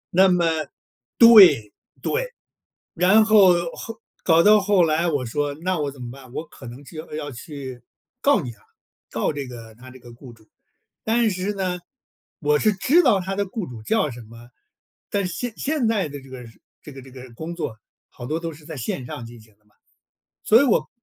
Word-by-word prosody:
那 190 Hz, +2 st, +6 dB
么， 180 Hz, -2 st, +2 dB, 0.7 s
对， 185 Hz, -, +7 dB, 0.3 s
对。 -, -, -2 dB, 0.6 s
然 190 Hz, +6 st, +4 dB
后 205 Hz, -4 st, +6 dB, 0.2 s
后 225 Hz, 0 st, -9 dB, 0.2 s
搞 165 Hz, -1 st, +4 dB
到 210 Hz, +2 st, +6 dB
后 200 Hz, -2 st, +3 dB
来， 165 Hz, +1 st, +1 dB
我 145 Hz, -6 st, -1 dB
说 145 Hz, +5 st, -2 dB
那 185 Hz, -1 st, -1 dB
我 145 Hz, -1 st, -1 dB
怎 135 Hz, -2 st, -14 dB
么 120 Hz, -1 st, -7 dB
办， 130 Hz, -1 st, -14 dB
我 160 Hz, -, -5 dB
可 130 Hz, -, -13 dB
能 120 Hz, +4 st, -11 dB
就 155 Hz, +3 st, -9 dB
要 145 Hz, -2 st, -5 dB
去 130 Hz, -1 st, -9 dB, 0.4 s
告 280 Hz, -7 st, +3 dB
你 125 Hz, -6 st, -6 dB
了， 115 Hz, -, -19 dB, 0.5 s
告 -, -, -1 dB
这 140 Hz, -2 st, -5 dB
个 115 Hz, -3 st, -11 dB
他 130 Hz, +3 st, -14 dB
这 130 Hz, -, -14 dB
个 120 Hz, -1 st, -14 dB
雇 120 Hz, 0 st, -13 dB
主。 110 Hz, -1 st, -23 dB, 0.6 s
但 230 Hz, 0 st, +2 dB
是 190 Hz, +1 st, -3 dB
呢， 185 Hz, -2 st, -3 dB, 0.6 s
我 150 Hz, -1 st, +2 dB
是 215 Hz, +5 st, +2 dB
知 275 Hz, -, +3 dB
道 195 Hz, -, +3 dB
他 190 Hz, +2 st, -4 dB
的 200 Hz, -, 0 dB
雇 195 Hz, +1 st, -5 dB
主 120 Hz, -3 st, -10 dB
叫 155 Hz, -, 0 dB
什 120 Hz, 0 st, -10 dB
么， 115 Hz, +2 st, -15 dB, 0.6 s
但 200 Hz, -1 st, -1 dB
是 180 Hz, -, -6 dB
现 235 Hz, +8 st, -4 dB
现 285 Hz, -4 st, -1 dB
在 210 Hz, -8 st, 0 dB
的 145 Hz, -1 st, -9 dB
这 135 Hz, -, -16 dB
个 130 Hz, -1 st, -9 dB, 0.4 s
这 150 Hz, -, -10 dB
个 135 Hz, -, -10 dB
这 130 Hz, -, -14 dB
个 130 Hz, -1 st, -12 dB
工 160 Hz, +7 st, -7 dB
作 125 Hz, -10 st, -5 dB, 0.3 s
好 120 Hz, -, -10 dB
多 155 Hz, -, -2 dB
都 165 Hz, 0 st, -5 dB
是 150 Hz, 0 st, -16 dB
在 160 Hz, -, -8 dB
线 125 Hz, +1 st, -4 dB
上 125 Hz, -1 st, -7 dB
进 115 Hz, 0 st, -12 dB
行 110 Hz, -1 st, -23 dB
的 105 Hz, -, -40 dB
嘛。 105 Hz, -, -34 dB, 0.7 s
所 225 Hz, -, +6 dB
以 -, -, +3 dB
我 250 Hz, -, +1 dB
155 Hz, 220 characters per minute, -22 LUFS, 125-195 Hz, 0.7 s, 对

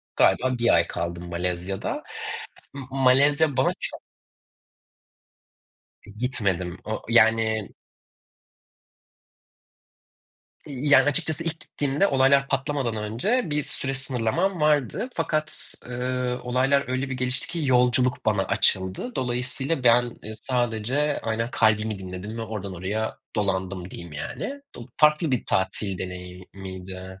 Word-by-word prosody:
galiba 125 Hz, +6 st, +3 dB
1 120 Hz, 0 st, +2 dB
ay 85 Hz, 0 st, +4 dB
kaldım 85 Hz, +1 st, -4 dB
Malezya'da. 90 Hz, +2 st, -3 dB, 0.7 s
Imm, 135 Hz, -2 st, -7 dB
Malezya 140 Hz, +3 st, +4 dB
bana 130 Hz, -, +3 dB
çok -, -, -4 dB, 2.0 s
Gitmedim, 100 Hz, -6 st, -2 dB
o 110 Hz, 0 st, -4 dB
yani 110 Hz, -2 st, +3 dB, 2.9 s
Yani, 145 Hz, +1 st, +4 dB
açıkçası 160 Hz, +1 st, +1 dB
ilk 165 Hz, -1 st, -3 dB
gittiğimde 145 Hz, +7 st, 0 dB
olaylar 135 Hz, -1 st, +4 dB
patlamadan 135 Hz, -4 st, -1 dB
önce 115 Hz, -, 0 dB
bir 150 Hz, 0 st, +1 dB
süre 135 Hz, 0 st, -3 dB
sınırlamam 135 Hz, -, +1 dB
vardı 150 Hz, -, +2 dB
fakat, 155 Hz, 0 st, -1 dB
ııı, 125 Hz, 0 st, -2 dB
olaylar 130 Hz, +3 st, +2 dB
öyle 130 Hz, +1 st, -1 dB
bir 130 Hz, -, -1 dB
gelişti 125 Hz, +1 st, -2 dB
ki, 170 Hz, 0 st, -3 dB
yolculuk 125 Hz, -1 st, +3 dB
bana 105 Hz, -3 st, +3 dB
açıldı. 95 Hz, -, 0 dB
Dolayısıyla 125 Hz, +3 st, -1 dB
ben, 120 Hz, +1 st, +6 dB, 0.2 s
ııı, 110 Hz, +1 st, -6 dB
sadece 125 Hz, +4 st, 0 dB
aynen 115 Hz, +1 st, -1 dB
kalbimi 110 Hz, -1 st, +2 dB
dinledim 95 Hz, +4 st, -7 dB
ve -, -, -2 dB
oradan 100 Hz, -4 st, -5 dB
oraya 105 Hz, +5 st, -2 dB, 0.2 s
dolandım 95 Hz, -2 st, -1 dB
diyeyim, 85 Hz, -3 st, -9 dB
yani. 275 Hz, -, -5 dB
Do 120 Hz, -, -9 dB
farklı 150 Hz, 0 st, +4 dB
bir 125 Hz, -, 0 dB
tatil 95 Hz, 0 st, -1 dB
deneyimiydi. 95 Hz, +1 st, -8 dB
120 Hz, 115 wpm, -25 LUFS, 95-135 Hz, 2.9 s, ben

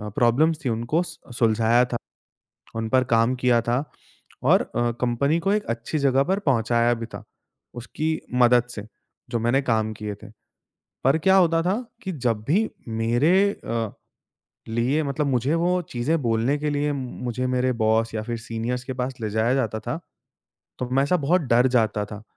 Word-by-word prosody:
अ, 105 Hz, -, -6 dB
problems 150 Hz, +7 st, +2 dB
थीं, 125 Hz, -, +1 dB
उनको 120 Hz, +9 st, 0 dB
सु 140 Hz, -7 st, -11 dB
सुलझाया 115 Hz, +1 st, +3 dB
था। 125 Hz, -1 st, -4 dB, 0.8 s
उन 115 Hz, 0 st, -2 dB
पर 130 Hz, +1 st, +3 dB
काम 115 Hz, +2 st, +3 dB
किया 125 Hz, -1 st, +3 dB
था 120 Hz, +4 st, 0 dB, 0.6 s
और -, -, +5 dB
अ, 120 Hz, 0 st, -1 dB
कंपनी 140 Hz, +6 st, +1 dB
को 195 Hz, +4 st, 0 dB
एक 210 Hz, 0 st, 0 dB
अच्छी 115 Hz, +6 st, -3 dB
जगह 135 Hz, -1 st, +3 dB
पर 190 Hz, +6 st, 0 dB
पहुँचाया 120 Hz, -, +2 dB
भी 115 Hz, -1 st, -5 dB
था, 115 Hz, -, -10 dB, 0.5 s
उसकी 135 Hz, +6 st, -3 dB, 0.3 s
मदद 120 Hz, 0 st, +5 dB
से, 105 Hz, -, -6 dB, 0.5 s
जो 120 Hz, -1 st, -1 dB
मैंने 120 Hz, +4 st, +2 dB
काम 110 Hz, -1 st, 0 dB
किए 105 Hz, -1 st, -4 dB
थे। -, -, -9 dB, 0.8 s
पर 135 Hz, +4 st, +4 dB
क्या 190 Hz, 0 st, +6 dB
होता 165 Hz, -3 st, +4 dB
था 185 Hz, +4 st, +1 dB, 0.3 s
कि 190 Hz, -, -4 dB
जब 120 Hz, -8 st, -1 dB
भी 205 Hz, +9 st, +2 dB, 0.3 s
मेरे 120 Hz, +8 st, +2 dB, 0.2 s
अ, 115 Hz, -, -4 dB, 0.8 s
लिए 120 Hz, +7 st, +1 dB
मतलब 145 Hz, +1 st, -1 dB
मुझे 135 Hz, +2 st, +1 dB
वो 180 Hz, +1 st, +2 dB
चीज़ें 145 Hz, +7 st, 0 dB
बोलने 115 Hz, +4 st, +1 dB
के 150 Hz, 0 st, -1 dB
लिए 145 Hz, 0 st, 0 dB
मुझे 125 Hz, -1 st, -4 dB
मेरे 130 Hz, 0 st, +2 dB
बॉस 110 Hz, +1 st, +2 dB
या 110 Hz, -, -2 dB
फिर 120 Hz, +1 st, -4 dB
सीनियर्स 115 Hz, +2 st, -4 dB
के 130 Hz, -, -4 dB
पास 130 Hz, +1 st, -2 dB
ले 110 Hz, -1 st, -3 dB
जाया 110 Hz, +4 st, +1 dB
जाता 110 Hz, -5 st, -1 dB
था, 160 Hz, -, -4 dB, 0.8 s
तो 125 Hz, -, -3 dB
मैं 135 Hz, +2 st, +3 dB
ऐसा 180 Hz, +6 st, +2 dB
बहुत 180 Hz, +5 st, +4 dB
डर 120 Hz, +2 st, +5 dB
जाता 110 Hz, -2 st, +1 dB
था, 105 Hz, 0 st, -9 dB
125 Hz, 180 wpm, -24 LUFS, 115-145 Hz, 0.8 s, क्या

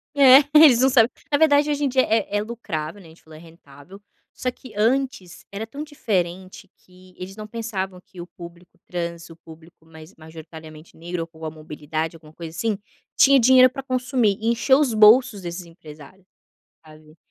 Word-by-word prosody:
É, 270 Hz, -1 st, +8 dB, 0.2 s
eles 290 Hz, -6 st, +7 dB
não 265 Hz, -, +4 dB
sabem. 240 Hz, -2 st, +4 dB, 0.2 s
Na 285 Hz, -, +3 dB
verdade, 295 Hz, -1 st, +3 dB
hoje 290 Hz, 0 st, -2 dB
em 275 Hz, -, 0 dB
dia, 260 Hz, +1 st, +2 dB
é 225 Hz, -1 st, +1 dB
é 205 Hz, -, +1 dB
é -, -, -1 dB
lucrável, 205 Hz, -7 st, -6 dB
né, 170 Hz, -, -16 dB
a -, -, -16 dB
gente 160 Hz, -, -20 dB
falou, 155 Hz, -1 st, -15 dB
é -, -, -14 dB
rentável, 165 Hz, +2 st, -17 dB, 0.3 s
só 255 Hz, -, -3 dB
que 250 Hz, -2 st, -13 dB
antes 230 Hz, -4 st, -2 dB
era 215 Hz, +3 st, -6 dB
tão 285 Hz, +5 st, -8 dB
diferente 190 Hz, -, -4 dB
que 185 Hz, 0 st, -21 dB
eles 185 Hz, +1 st, -9 dB
não 215 Hz, 0 st, -9 dB
pensavam 205 Hz, -5 st, -6 dB
que 185 Hz, -, -17 dB
o -, -, -8 dB
público 175 Hz, -1 st, -15 dB
trans, 170 Hz, -1 st, -6 dB
o 165 Hz, -, -13 dB
público 165 Hz, 0 st, -18 dB
mais 160 Hz, +3 st, -15 dB
majoritariamente 160 Hz, 0 st, -13 dB
negro 170 Hz, +1 st, -6 dB
ou 165 Hz, -, -6 dB
com 160 Hz, -1 st, -12 dB
a 155 Hz, -, -5 dB
mobilidade, 155 Hz, +1 st, -6 dB
alguma 155 Hz, -1 st, -17 dB
coisa 165 Hz, 0 st, -10 dB
assim, 225 Hz, -3 st, -2 dB, 0.4 s
tinha 275 Hz, 0 st, +5 dB
dinheiro 255 Hz, +1 st, +6 dB
para 270 Hz, 0 st, -8 dB
consumir. 250 Hz, -5 st, -1 dB
E 220 Hz, -, -4 dB
encheu 250 Hz, +4 st, +2 dB
os 265 Hz, -6 st, 0 dB
bolsos 215 Hz, 0 st, +5 dB
desses 175 Hz, 0 st, -7 dB
empresário, 165 Hz, +2 st, -16 dB, 0.6 s
sabe. 155 Hz, 0 st, -18 dB
185 Hz, 195 wpm, -22 LUFS, 165-240 Hz, 0.6 s, É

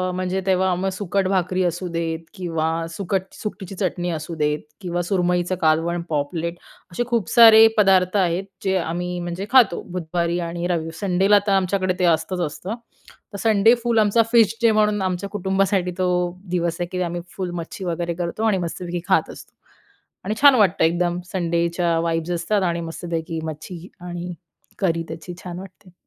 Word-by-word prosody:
म्हणजे 185 Hz, +1 st, -1 dB
तेव्हा 190 Hz, -1 st, +2 dB
मग 190 Hz, +2 st, -1 dB
सुकट 195 Hz, 0 st, -1 dB
भाकरी 185 Hz, -1 st, +1 dB
असू 175 Hz, +1 st, -2 dB
देत 165 Hz, -1 st, -2 dB
किंवा 165 Hz, -2 st, -2 dB
सुकट 190 Hz, +2 st, -2 dB
सुकटीची 195 Hz, -3 st, -7 dB
चटणी 180 Hz, -2 st, -2 dB
असू 160 Hz, +1 st, -5 dB
देत 150 Hz, -1 st, 0 dB, 0.2 s
किंवा 175 Hz, -1 st, -2 dB
सुरमईचं 180 Hz, -1 st, 0 dB
कालवण, 165 Hz, +2 st, +2 dB
पॉपलेट 165 Hz, +3 st, -2 dB, 0.3 s
असे 240 Hz, +8 st, -1 dB
खूप 235 Hz, -6 st, 0 dB
सारे 225 Hz, -2 st, +9 dB
पदार्थ 190 Hz, -1 st, +4 dB
आहेत. 180 Hz, 0 st, +1 dB, 0.2 s
जे 190 Hz, -1 st, +1 dB
आम्ही 175 Hz, +1 st, -3 dB
म्हणजे 175 Hz, +3 st, -4 dB
खातो, 250 Hz, -9 st, +5 dB
बुधवारी 170 Hz, 0 st, -1 dB
आणि 170 Hz, +1 st, -3 dB
रवि 165 Hz, -2 st, -1 dB
संडेला 195 Hz, +1 st, +3 dB
तर 200 Hz, -, +2 dB
आमच्याकडे 185 Hz, -1 st, +1 dB
ते 180 Hz, -, +3 dB
असतंच 170 Hz, +2 st, +1 dB
असतं 190 Hz, +8 st, -6 dB, 0.6 s
तर -, -, -4 dB
संडे 220 Hz, 0 st, +5 dB
फुल 235 Hz, -2 st, +2 dB
आमचा 215 Hz, +2 st, +4 dB
फिश 225 Hz, -2 st, +5 dB
डे 230 Hz, -1 st, +5 dB
म्हणून 210 Hz, -1 st, +2 dB
आमच्या 185 Hz, +1 st, -2 dB
कुटुंबासाठी 190 Hz, -2 st, 0 dB
तो 185 Hz, -1 st, +1 dB, 0.4 s
दिवस 170 Hz, -2 st, -1 dB
आहे, 175 Hz, -, -2 dB
की 185 Hz, 0 st, -2 dB
आम्ही 175 Hz, 0 st, -3 dB, 0.2 s
फुल 185 Hz, -2 st, -3 dB
मच्छी 185 Hz, +3 st, -8 dB
वगैरे 170 Hz, 0 st, -2 dB
करतो 175 Hz, +5 st, -3 dB
आणि 215 Hz, -4 st, +3 dB
मस्तपैकी 175 Hz, 0 st, -4 dB
खात -, -, +2 dB
असतो -, -, -12 dB, 0.7 s
आणि 215 Hz, -, -1 dB
छान 285 Hz, -2 st, +8 dB
वाटतं, 200 Hz, -8 st, +3 dB
एकदम 175 Hz, +1 st, 0 dB
संडेच्या 170 Hz, -1 st, 0 dB
वाईब्स 165 Hz, +1 st, -1 dB
असतात 180 Hz, +4 st, 0 dB
आणि 170 Hz, -1 st, 0 dB
मस्तपैकी 165 Hz, 0 st, -4 dB
मच्छी 160 Hz, +3 st, -7 dB
आणि 175 Hz, 0 st, -6 dB, 0.5 s
करी 170 Hz, -4 st, +1 dB
त्याची 165 Hz, +2 st, -7 dB
छान 180 Hz, 0 st, -6 dB
वाटते. 190 Hz, -1 st, -13 dB
180 Hz, 165 wpm, -22 LUFS, 170-195 Hz, 0.7 s, सारे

